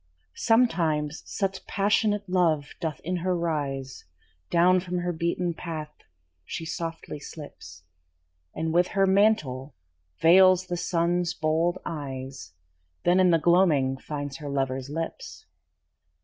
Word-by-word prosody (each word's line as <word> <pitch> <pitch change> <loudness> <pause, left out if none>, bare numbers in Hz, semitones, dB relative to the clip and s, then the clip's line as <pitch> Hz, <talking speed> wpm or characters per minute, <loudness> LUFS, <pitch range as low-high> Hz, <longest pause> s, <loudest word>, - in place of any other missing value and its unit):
Sometimes 165 -11 +2
such 195 -2 -3
passionate 205 0 +1
love 165 -6 +1
doth 160 -2 -3
in 180 +2 -2
her 180 +1 0
rise, 140 -6 -3 0.4
Down 180 +2 +4
from 180 0 -4
her 175 0 -1
beaten 170 +1 -1
path 155 -3 -6 0.5
she 165 - -6
softly 165 -2 -5
slips, 80 - -11 0.7
And 160 0 -2
with 175 +1 +4
her 195 - +5
mantle 155 -10 +2 0.4
veils 185 +2 +6
the 180 - -3
Sun's 175 0 0
bold 165 +3 +1
eyes, 135 - -6 0.5
Then 180 +1 +4
in 185 -1 +5
the 165 - +5
gloaming 160 -6 +3
finds 145 0 -6
her 145 -2 -7
lover's 135 -1 -2
lips. 165 +2 -6
165 Hz, 120 wpm, -26 LUFS, 145-180 Hz, 0.7 s, veils